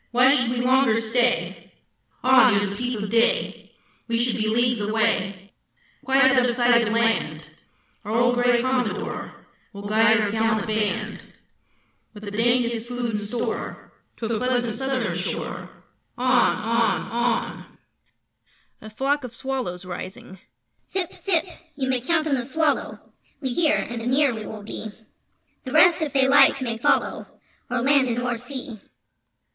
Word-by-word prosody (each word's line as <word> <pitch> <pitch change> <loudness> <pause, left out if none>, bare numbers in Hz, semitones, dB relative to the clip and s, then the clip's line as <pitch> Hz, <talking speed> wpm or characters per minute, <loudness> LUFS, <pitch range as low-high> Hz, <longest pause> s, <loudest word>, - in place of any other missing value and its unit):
Why 250 +3 +4
should 250 -3 +1
we 245 0 -1
longer 255 -3 +3
stay? 240 +2 -1 0.5
On! 255 -3 +6
Ere 200 +1 +1
the 200 0 -5
peep 245 0 -3
of 210 0 -5
day 230 0 0 0.3
We 230 -1 0
should 240 0 0
be 215 -1 -1
leagues 240 +1 +1
away, 205 -3 -1 0.5
Quite 265 +1 +3
out 265 0 +5
of 245 -1 0
sight 240 -2 +3
of - - -1
land! 225 -10 0 0.6
Our 210 - -5
old 240 +1 +3
gray 245 -1 +2
Commodore 255 -4 -3 0.3
Will 200 0 -8
guide 220 +1 +4
our 210 -2 0
gallant 220 -1 0
band 215 -1 -2 0.9
With 210 - -11
the 205 - -6
daintiest 235 +1 0
food 245 -1 -3
in 210 - -2
store! 220 +3 -5 0.2
To 230 - -5
a 225 0 -1
pleasant 245 -2 0
southern 265 +2 -2
shore, - - -5 0.5
On! 255 0 +3
On! 230 +1 0
On! 235 0 -2 1.0
[A 215 - -10
Flock 275 +6 -1
of 245 -2 -8
Swallows 250 -10 -4
Rising]: 185 +1 -8 0.5
Zip! 375 -3 -2
Zip! 360 -4 0 0.3
You 270 -2 -3
may 255 -2 0
count 315 +4 0
on 305 - 0
the 260 - +1
Swallow! 295 +4 -1 0.4
We 265 - -3
hear, 315 +3 +2
and 235 -1 -4
anear 260 +3 +2
we 220 -2 -7
will 215 -1 -8
be; 220 - -6 0.8
The 260 - -7
rest, 330 +3 +5
if 305 -2 -2
they 265 -1 +3
like, 275 0 +5
may 230 -4 -3
follow - - 0 0.4
O'er 245 -1 -1
land 275 0 +3
and 235 -1 -2
o'er 245 0 -1
sea. 245 -2 -7
240 Hz, 155 wpm, -23 LUFS, 220-260 Hz, 1.0 s, On